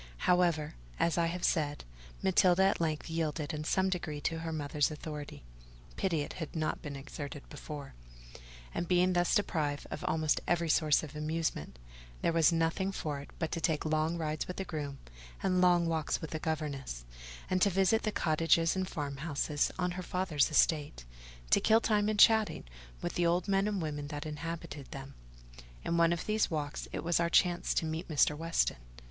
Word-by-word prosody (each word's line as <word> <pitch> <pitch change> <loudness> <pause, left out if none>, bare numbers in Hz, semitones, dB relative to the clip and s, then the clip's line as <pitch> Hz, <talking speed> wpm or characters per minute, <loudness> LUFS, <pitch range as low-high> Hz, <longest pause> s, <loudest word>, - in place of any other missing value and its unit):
However, 170 -4 +2 0.3
as 170 - +2
I 165 - +3
have 175 +1 -4
said, 145 -3 +1 0.4
Matilda 190 0 +4
at 195 -2 +2
length 155 -2 -1
yielded 160 -2 -2
in 150 0 -3
some 190 +4 +1
degree 170 -5 -2
to 165 +3 -1
her 165 0 -4
mother's 145 -2 0
authority 150 - -7 0.5
(pity 165 -5 0
it 145 - -5
had 160 - -5
not 155 -1 -1
been 145 -2 -6
exerted 145 +1 -7
before); 145 -1 -8 0.8
and 170 - -2
being 180 +1 +3
thus 175 +3 +2
deprived 155 -8 0
of - - -5
almost 155 -1 +1
every 170 -1 +1
source 155 -1 +3
of 155 0 -8
amusement, 150 - -2 0.5
there 170 - +2
was 165 -1 +5
nothing 165 +4 +1
for 150 -6 -3
it 140 - -10
but 160 -2 -2
to 165 - -2
take 160 -2 0
long 155 +2 +1
rides 155 -2 -2
with 180 - -6
the 195 - -3
groom 150 -5 -4 0.5
and 185 -1 +2
long 175 -1 +5
walks 160 -2 0
with 160 - -7
the 155 - -3
governess, 145 - -3 0.4
and 185 0 0
to 200 - +5
visit 195 +4 +3
the 215 - -1
cottages 165 0 +2
and 190 -1 -1
farmhouses 145 0 -1
on 180 -1 0
her 180 +1 -4
father's 180 -5 +1
estate, 150 - +2 0.5
to - - +5
kill 220 +1 +5
time 210 -2 +2
in 215 - -1
chatting 220 0 +5 0.4
with - - -2
the 175 - +1
old 175 +2 +1
men 195 0 +2
and 200 -5 -1
women 145 -2 -4
that 145 0 -5
inhabited 155 -1 -6
them. 135 0 -8 0.7
In 170 - 0
one 170 0 +4
of 170 - -2
these 215 0 +1
walks, 150 -3 -3
it - - -4
was 170 +1 +2
our 170 0 +2
chance 175 0 +3
to - - +1
meet 160 +2 -3
Mr. 150 -1 +3
Weston. 165 +2 0
160 Hz, 185 wpm, -32 LUFS, 150-180 Hz, 0.8 s, was